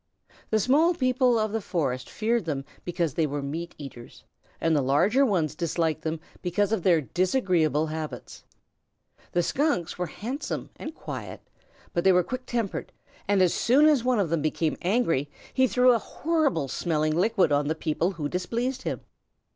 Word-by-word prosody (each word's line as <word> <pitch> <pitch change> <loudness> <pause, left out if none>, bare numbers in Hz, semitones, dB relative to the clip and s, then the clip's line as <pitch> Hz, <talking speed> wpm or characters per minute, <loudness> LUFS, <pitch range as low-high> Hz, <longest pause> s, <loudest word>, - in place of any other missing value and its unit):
The 220 - +2
small 305 - +3
people 255 -3 +2
of 215 -1 0
the 225 0 -1
forest 135 -10 -2
feared 225 -2 0
them 140 -4 -3 0.2
because 170 -4 -1
they 160 +1 +1
were 145 0 -3
meat 165 +5 -5
eaters, 130 -5 -10 0.4
and 165 -1 +2
the 145 - +3
larger 185 - +3
ones 180 - +1
disliked 160 -1 -1
them 160 0 -3 0.2
because 195 +4 0
of 220 -4 +1
their 170 -3 +4
disagreeable 175 - +1
habits. 155 -1 -6 0.9
The 175 - +2
Skunks 260 - 0
were 180 - -1
handsome 250 - -5
and 310 - -7
quiet, - - -7 0.5
but 170 - 0
they 190 - +6
were 180 0 +4
quick 255 +7 -6
tempered, 230 -5 -2 0.4
and 200 -2 +4
as 180 - +3
soon 270 +6 +4
as 295 -6 +4
one 250 -1 +2
of 180 -6 0
them 165 -2 +1
became 155 +1 0
angry 175 - +1 0.2
he 260 0 +4
threw 250 0 +5
a 235 - +3
horrible 290 - 0
smelling 155 +2 0
liquid 185 -2 +2
on 145 0 +2
the 160 - 0
people 160 +4 -1
who 155 -4 -3
displeased 235 - -2
him. - - -3
180 Hz, 170 wpm, -26 LUFS, 155-240 Hz, 0.9 s, they